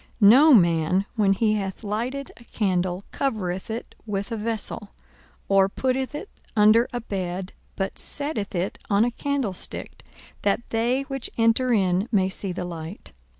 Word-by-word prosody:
42:008:016 200 -2 +8
No 290 +5 +7
man, 170 0 +3
when 205 -3 +3
he 215 +2 +2
hath 195 0 -3
lighted 240 +7 -3
a 235 - -15
candle, 185 -4 -1
covereth 195 -9 -2
it 225 +2 -5
with 200 +2 -3
a - - -1
vessel, 220 -1 -3 0.6
or 195 -1 +4
putteth 260 +5 -1
it 370 +8 -5 0.3
under 220 +3 +5
a 245 - -2
bed; 190 -4 -4 0.2
but 195 -1 -3
setteth 285 -9 -3
it 180 +2 -2
on 205 +2 +4
a 245 - 0
candlestick, 260 -7 -2 0.4
that 205 +4 0
they 240 +4 +1
which 270 -2 -3
enter 230 +2 +3
in 190 0 +2
may 190 -4 +3
see 190 0 -4
the 180 0 -4
light. 165 - -7
210 Hz, 155 wpm, -24 LUFS, 190-240 Hz, 0.6 s, 42:008:016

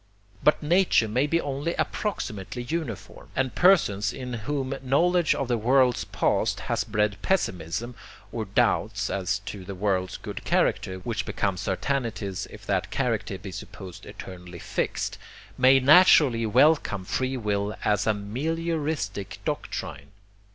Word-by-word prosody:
But 150 - +3
nature 170 -7 +3
may 125 +7 +1
be 165 +3 +2
only 145 +3 -2
approximately 120 - -3
uniform; 140 - -5
and 130 -1 0
persons 105 - +4
in 125 -1 -6
whom 135 +3 -2
knowledge 170 +6 +3
of 135 - -2
the 120 -2 0
world's 125 +2 +3
past - - 0
has - - -1
bred 105 -1 0
pessimism 105 - -1 0.4
(or 115 -2 -3
doubts 100 - +1
as 100 +1 0
to 95 -1 -6
the 95 +1 -7
world's 95 -2 -1
good - - -7
character, 95 0 +1
which 110 0 -2
become 100 -1 -1
certainties 100 0 -2
if - - -12
that - - 0
character 95 - -1
be 95 +1 -8
supposed 95 -1 -9
eternally 90 -2 -9
fixed) - - -3 0.4
may 130 +1 +6
naturally 135 -5 +6
welcome 125 -5 +3
free 130 +6 -1
will 105 -2 -1
as 105 0 +2
a 110 - +4
MELIORISTIC 145 - -3
doctrine. 70 0 -4
115 Hz, 135 wpm, -26 LUFS, 100-140 Hz, 0.4 s, may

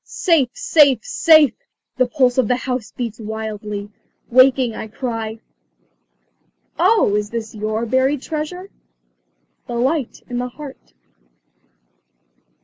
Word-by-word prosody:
"Safe! 320 -8 +1
safe! 285 - +3
safe!" 315 - +5 0.4
the 255 -1 +3
pulse 255 -1 +2
of 250 - +2
the 250 - +2
house 250 -3 -4
beats 230 -3 -5
wildly. 210 -1 -5 0.4
Waking, 255 -1 +4
I - - -6
cry 225 -1 -4 1.4
"Oh, 440 - +4
is 210 0 -1
this 225 -1 -5
your 215 +1 -2
buried 260 +3 +1
treasure? 360 +5 -5 1.0
The 240 - -5
light 265 +2 -1
in 245 -1 -3
the 250 0 -3
heart." 275 +1 -12
250 Hz, 115 wpm, -19 LUFS, 220-275 Hz, 1.4 s, safe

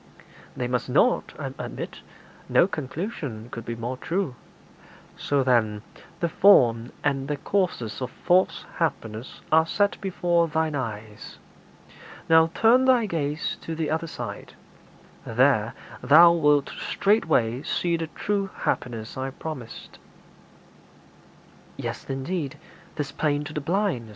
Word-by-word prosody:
'They 125 - -1
must 125 0 -2
not, - - +2
I - - -5
admit. - - -6 0.5
No - - +5
conclusion 145 - -5
could 115 - -7
be 115 - -4
more 120 +3 -4
true.' 170 -1 -2 0.8
'So, 140 -2 0
then, 110 -5 +2 0.4
the 170 - +2
form 125 - +5
and 135 -2 0
the 150 0 -2
causes 140 - -1
of 125 - -2
false 175 -1 +1
happiness 115 -8 -3
are 160 +1 +5
set 205 +3 0
before 175 -3 +1
thine 160 0 0
eyes. 110 -5 -6 0.9
Now 160 0 +6
turn 245 +3 +5
thy 255 -3 +4
gaze 155 -4 -2
to 165 - -5
the 155 -2 -2
other 160 +1 -1
side; - - -7 0.7
there 115 -2 +2 0.3
thou 170 +4 +8
wilt 150 -4 +3
straightway 155 - +1
see 170 +3 0
the 165 -1 -3
true 200 +4 -2
happiness 115 -2 -2
I 130 +1 -2
promised.' 135 -4 -8 1.8
'Yea, - - -3 0.2
indeed, 135 +2 -3 0.4
'tis 145 -2 -3
plain 145 0 0
to 150 +1 -8
the 150 - -3
blind.' 170 - -1
150 Hz, 125 wpm, -25 LUFS, 125-170 Hz, 1.8 s, thou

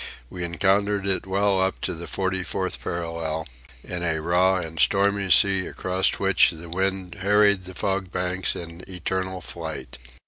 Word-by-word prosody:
We 90 -1 -5
encountered 100 +3 +1
it 95 -1 0
well 100 0 +2
up 95 0 0
to - - -2
the 85 0 -7
forty 95 -1 -1
fourth 95 0 -2
parallel, 80 -2 -3 0.4
in 90 - -5
a 80 -2 0
raw 90 +4 +3
and 80 -3 -4
stormy 100 +4 +3
sea 95 0 +5
across 95 +1 +1
which 95 -1 +4
the 85 0 -9
wind 95 +1 -1
harried 100 -1 +4
the 95 0 -9
fog 95 -1 -1
banks 90 +1 -1
in 85 +1 -8
eternal 95 +1 -3
flight. 80 -5 -6
95 Hz, 160 wpm, -24 LUFS, 85-95 Hz, 0.4 s, sea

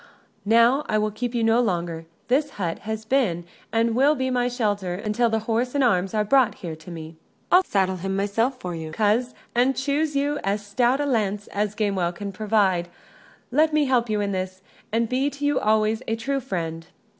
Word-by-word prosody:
Now 235 +6 +5
I 215 - +2
will 215 0 0
keep 240 +3 -4
you 235 - +1
no 225 +1 +4
longer: 170 -6 -2 0.2
this 285 +4 +2
hut 175 -4 -2
has 220 0 -3
been 215 -10 +1 0.3
and 225 +1 +2
will 275 +5 +4
be 260 -1 -1
my 245 -1 +1
shelter 205 -7 -1
until 210 +4 0
the 225 - +1
horse 240 +4 0
and 280 - +3
arms 195 -4 +2
are 210 - +2
brought 255 0 +3
here 165 -4 -6
to 160 +2 -13
me." 160 -1 -8 0.3
"I'll 365 +1 +7
saddle 190 - 0
him 195 +2 -3
myself 225 +6 0
for 180 -8 -5
you, 160 -1 -6
coz: 220 +6 +1 0.2
and 250 +3 +3
choose 290 +2 0
you 290 +1 0
as 200 +1 -1
stout 245 +5 +1
a 290 - 0
lance 210 -6 0
as 210 0 -2
Gamewell 190 -5 0
can 200 +2 -5
provide. 195 -4 +1 0.6
Let 310 +4 +3
me 305 -1 +3
help 245 -3 +1
you 210 -1 0
in 200 -1 -1
this, 185 0 -4 0.3
and 230 +1 +1
be 260 +4 +1
to 285 0 -5
you 290 -1 +2
always 215 +1 +2
a 225 - 0
true 275 +5 -2
friend." 165 -7 -4
220 Hz, 200 wpm, -24 LUFS, 195-255 Hz, 0.6 s, I'll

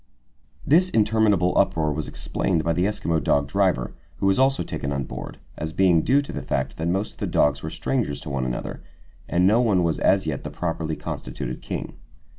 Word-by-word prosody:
This 175 +5 +5
interminable 105 - +2
uproar 80 -2 +2
was 75 +1 -3
explained 85 -4 -1
by 85 +1 +1
the 90 +2 +1
Eskimo 85 -6 0
dog 70 0 +2
driver, 90 -7 +1 0.2
who - - -2
was 95 +4 +3
also 135 +1 +3
taken 70 - -4
on 70 -1 -1
board, - - -7 0.2
as 80 +1 -4
being 90 -3 +4
due 140 - +3
to - - -7
the - - -4
fact 65 0 -2
that 80 - -2
most 95 +4 -1
of - - -26
the - - -2
dogs 75 0 +2
were 80 - -4
strangers 115 - -1
to - - -6
one 70 -2 -1
another, 60 -1 -4 0.5
and 90 +1 +3
no 110 +5 +5
one 100 -7 +3
was 80 -2 0
as 95 -2 +3
yet 75 -4 -3
the - - -4
properly 80 -2 -3
constituted 65 -4 -5
king. - - -5
85 Hz, 205 wpm, -24 LUFS, 75-105 Hz, 0.5 s, This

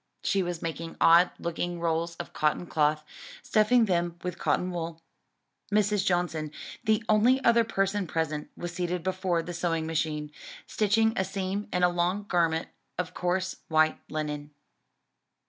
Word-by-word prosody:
She 195 0 +2
was 175 -2 -3
making 165 0 -5
odd 170 +2 +7
looking 170 +1 -3
rolls 170 0 -1
of - - -8
cotton 155 +3 +1
cloth; 150 -2 +1 0.4
stuffing 225 +2 +4
them 175 -3 0
with 180 -1 -4
cotton 180 0 +1
wool. 165 -2 -4 0.7
Mrs. 210 -1 +2
Johnson, 175 -5 0 0.3
the 220 -1 +2
only 230 +5 +4
other 235 0 +5
person 195 -3 0
present, 155 -2 -2
was 175 0 -5
seated 175 -1 -2
before 185 -2 0
the 175 - -6
sewing 165 -2 -1
machine, 155 -2 -2 0.3
stitching 220 +1 +2
a 190 - +1
seam 195 +1 -3
in 180 0 0
a 180 - +6
long 175 +3 0
garment 165 -4 +1 0.3
of 180 0 -3
coarse, 185 +1 -1
white 155 0 +3
linen. 150 -1 -4
175 Hz, 145 wpm, -28 LUFS, 165-195 Hz, 0.7 s, odd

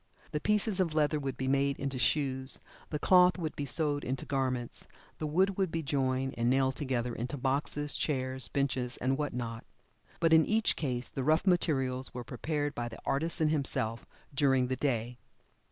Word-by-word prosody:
The 150 - -1
pieces 210 +1 +2
of 165 -4 +1
leather 150 0 +2
would 135 -3 -4
be 130 - -2
made 140 0 +2
into 135 -2 -3
shoes; 130 -1 0 0.3
the 150 - -2
cloth 180 +3 +5
would 160 -4 -3
be 145 - -3
sewed 145 +1 0
into 130 +1 -3
garments; 130 -3 -2 0.3
the 155 - -2
wood 190 +5 +2
would 190 -2 +2
be 165 -1 -2
joined, 135 -2 0
and 120 +1 +2
nailed 130 0 +2
together 125 -4 -1
into 120 +5 -4
boxes, 145 +2 0
chairs, 130 -3 -1
benches 130 -3 -1
and 130 +2 +1
what 145 0 -2
not. 115 -2 -4 0.6
But 165 -1 +3
in 160 0 +7
each 220 +3 +2
case 125 -5 -2
the 135 - -3
rough 155 +6 +3
materials 135 -9 +1
were 125 - -4
prepared 145 +4 -2
by 120 -2 -3
the 110 - -9
artisan 160 +2 +1
himself 120 -6 -1 0.3
during 135 -3 +3
the 130 - 0
day. 125 -2 -1
135 Hz, 180 wpm, -31 LUFS, 130-155 Hz, 0.6 s, in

